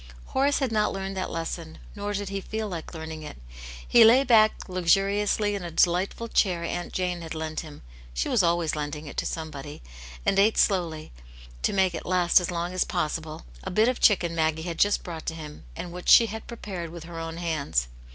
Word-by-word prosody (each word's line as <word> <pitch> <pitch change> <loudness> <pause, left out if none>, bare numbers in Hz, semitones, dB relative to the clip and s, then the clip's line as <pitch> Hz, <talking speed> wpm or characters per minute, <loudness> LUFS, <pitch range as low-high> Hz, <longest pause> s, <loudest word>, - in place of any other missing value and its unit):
Horace 280 +2 +1
had 265 -4 -1
not 210 -1 +2
learned 195 0 -4
that 185 - -2
lesson, 165 -1 -5 0.2
nor 205 0 -3
did 205 -1 -3
he 195 0 -3
feel 220 +2 -4
like 175 -3 -7
learning 160 0 -6
it. 150 - -9 0.5
He 235 - +7
lay 240 +5 +7
back 220 -4 +4
luxuriously 195 +3 +2
in 200 - -3
a 175 - -4
delight 175 +3 +2
ful 230 - -7
chair 180 -6 +1
Aunt 175 +1 -3
Jane 180 -1 -2
had 165 -1 -6
lent 155 0 -3
him 150 -3 -9 0.2
— - - -19
she - - 0
was 215 - +3
always 170 -2 +1
lending 150 0 -4
it 145 - -9
to - - 0
somebody 150 - -6 0.2
— - - -14
and 195 - +3
ate 215 +2 +4
slowly, 170 -6 +1 0.5
to - - +1
make 190 -2 +2
it 165 - -6
last 180 -1 +4
as 180 - -3
long 175 0 -3
as 185 - +2
possible, 155 - -3 0.2
a - - -4
bit 215 +5 +3
of 255 -1 0
chicken 175 -5 +4
Maggie 160 -1 0
had.. 170 -1 -5
just 205 0 +3
brought 165 -3 -7
to 165 - -2
him, 150 - -9
and 175 - -6
which 180 +1 -5
she 230 - +9
had 220 0 -7
prepared 190 -7 -6
with 170 0 -9
her 170 0 -8
own 165 0 -5
hands. 155 - -1
175 Hz, 220 wpm, -26 LUFS, 160-200 Hz, 0.5 s, she